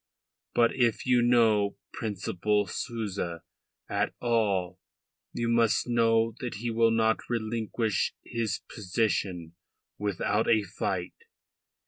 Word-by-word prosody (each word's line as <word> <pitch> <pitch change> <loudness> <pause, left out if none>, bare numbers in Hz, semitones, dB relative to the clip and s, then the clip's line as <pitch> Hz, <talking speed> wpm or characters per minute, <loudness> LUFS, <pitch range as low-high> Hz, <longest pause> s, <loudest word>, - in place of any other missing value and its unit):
But 120 -1 +4
if 120 -4 +1
you 125 -1 +4
know 115 -4 +3 0.2
Principal 105 0 -1
Souza 95 -5 -4 0.4
at - - -1
all, 105 -7 0 0.5
you 120 - -2
must 115 -1 +2
know 115 -1 +3
that 125 -2 -4
he 115 +3 -3
will 115 0 +4
not 110 0 +1
relinquish 110 -2 -1
his 115 -2 -2
position 90 -4 -1 0.5
without 105 +2 0
a 110 -2 +4
fight. 95 -2 -3
110 Hz, 105 wpm, -28 LUFS, 100-115 Hz, 0.5 s, But